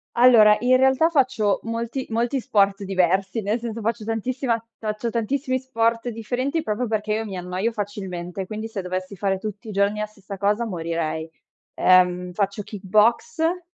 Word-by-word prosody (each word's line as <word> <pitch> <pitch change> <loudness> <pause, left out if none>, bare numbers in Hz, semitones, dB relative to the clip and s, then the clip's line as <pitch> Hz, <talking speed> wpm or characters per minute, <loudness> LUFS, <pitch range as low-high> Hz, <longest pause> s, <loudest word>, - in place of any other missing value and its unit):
Allora, 230 -4 +7
in 250 +1 +4
realtà 265 +5 +4
faccio 250 - +2
molti 230 +3 -3
molti 235 +4 0
sport 200 -5 +2
diversi, 190 +2 +1
nel 210 +3 -1
senso 230 -1 -5
faccio 225 +1 -2
tantissima 235 +2 -1 0.2
ta 220 - -6
faccio 215 +2 -4
tantissimi 255 +3 -1
sport 230 -2 0
differenti, 250 +7 -2
proprio 220 +3 -1
perché 215 -1 -1
io 225 +1 -1
mi 195 -3 -6
annoio 180 +5 -2
facilmente, 190 -3 -5
quindi 215 +2 -5
se 220 -3 -5
dovessi 185 +2 -4
fare 195 0 0
tutti 210 +3 -7
i - - -4
giorni 200 +1 +1
la 215 - -2
stessa 200 -1 -10
cosa 205 +4 +1
morirei. 165 -4 -3 0.5
Ehm, 180 0 +4
faccio 200 +2 -1
kick 200 -1 -9
boxe, 320 - +2
215 Hz, 165 wpm, -23 LUFS, 195-235 Hz, 0.5 s, Allora